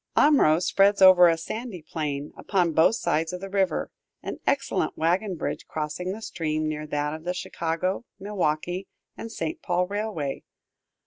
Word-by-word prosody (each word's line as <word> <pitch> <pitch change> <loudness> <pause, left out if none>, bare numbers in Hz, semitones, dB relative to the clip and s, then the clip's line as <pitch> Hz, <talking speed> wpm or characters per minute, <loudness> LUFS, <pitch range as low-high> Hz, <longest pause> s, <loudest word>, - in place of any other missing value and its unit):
Omro 275 - +5
spreads 200 +3 +3
over 185 -2 +8
a 165 -1 +3
sandy 205 +1 -6
plain, 150 -2 -4
upon 180 -4 0
both 160 +8 +4
sides 165 -4 0
of 180 - -4
the 195 +1 -8
river, 190 -5 0 0.3
an - - -5
excellent - - 0
wagon 180 +4 +1
bridge - - -4
crossing 155 +4 -3
the 220 +3 -7
stream 155 -4 -2
near 155 0 -4
that 150 0 -1
of 160 0 -7
the 180 +1 -2
Chicago, 170 +4 -2 0.2
Milwaukee, 185 -2 -2 0.3
and 225 - -7
St. 325 +8 -4
Paul 180 - +1
railway. 200 -8 -3
175 Hz, 155 wpm, -26 LUFS, 155-195 Hz, 0.3 s, over